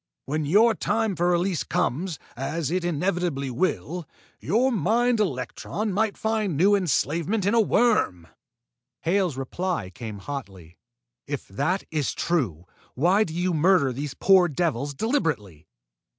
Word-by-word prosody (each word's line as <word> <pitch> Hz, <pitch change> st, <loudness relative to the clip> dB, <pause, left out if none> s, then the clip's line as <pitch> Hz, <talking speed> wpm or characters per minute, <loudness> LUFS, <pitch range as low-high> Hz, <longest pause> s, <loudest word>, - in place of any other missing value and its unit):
When 150 Hz, +4 st, -2 dB
your 220 Hz, +8 st, +5 dB
time 220 Hz, -1 st, 0 dB
for 175 Hz, +1 st, +1 dB
release 175 Hz, -1 st, +1 dB
comes, 165 Hz, +5 st, -1 dB, 0.2 s
as 145 Hz, +4 st, -3 dB
it 185 Hz, 0 st, 0 dB
inevitably 170 Hz, -4 st, -1 dB
will, 175 Hz, +4 st, -2 dB, 0.3 s
your 250 Hz, +6 st, +2 dB
mind 230 Hz, -, +2 dB
electron 190 Hz, -, -2 dB
might 210 Hz, +1 st, 0 dB
find 215 Hz, -7 st, -1 dB
new 195 Hz, +6 st, +4 dB
enslavement 180 Hz, -, 0 dB
in 200 Hz, -, +2 dB
a 230 Hz, -, +5 dB
worm!" 210 Hz, -, +2 dB, 0.7 s
Hale's 175 Hz, -4 st, +1 dB
reply 135 Hz, -, -3 dB
came 110 Hz, +1 st, -7 dB
hotly. 95 Hz, -, -8 dB, 0.5 s
"If 145 Hz, -1 st, -4 dB
that 180 Hz, -, -1 dB
is 150 Hz, -4 st, -1 dB
true, 115 Hz, -, -1 dB, 0.3 s
why 180 Hz, +10 st, +3 dB
do 160 Hz, -5 st, -6 dB
you 180 Hz, +1 st, 0 dB
murder 160 Hz, -4 st, +3 dB
these 140 Hz, +2 st, -5 dB
poor 190 Hz, -2 st, +5 dB
devils 145 Hz, -3 st, -1 dB
deliberately!" 135 Hz, -, -2 dB
170 Hz, 135 wpm, -25 LUFS, 135-195 Hz, 0.7 s, your